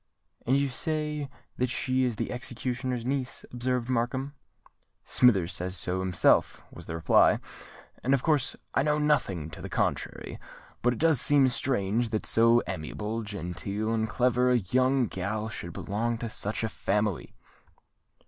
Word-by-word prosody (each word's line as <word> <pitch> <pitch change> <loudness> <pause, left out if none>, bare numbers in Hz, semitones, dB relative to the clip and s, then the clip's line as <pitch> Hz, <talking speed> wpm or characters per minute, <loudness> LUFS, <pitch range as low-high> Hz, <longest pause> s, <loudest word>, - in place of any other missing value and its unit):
"And 130 +3 +4
you 140 - +1
say 150 0 -2 0.3
that 125 0 0
she 130 +1 0
is 120 -3 -1
the - - -3
executioner's 125 0 -3
niece?" 130 -1 -2
observed 125 0 -1
Markham. 130 +3 -1 0.7
"Smithers 95 -9 +3
says 90 +2 -3
so 90 +2 -1
himself," 95 -2 +2
was - - -11
the 80 - -4
reply; 80 - +4 0.6
"and 135 +2 +4
of 130 - -3
course 150 -5 +1 0.2
I - - +3
know 150 +1 +2
nothing 100 - 0
to - - -10
the - - -6
contrary; - - -2 0.4
but 120 0 +2
it - - -6
does 160 -5 +4
seem 140 -2 +5
strange 120 -3 0
that 110 -1 -2
so 115 +1 +4
amiable, 105 +6 -4
genteel, 100 +1 -4
and 110 -1 0
clever, 125 +1 +2
a 125 - +4
young 130 +5 +2
gal 105 +2 -3
should 85 -5 -7
belong 115 +3 -2
to 115 -1 -5
such 105 +2 -3
a - - +1
family!" 105 -3 -2
120 Hz, 155 wpm, -28 LUFS, 105-130 Hz, 0.7 s, seem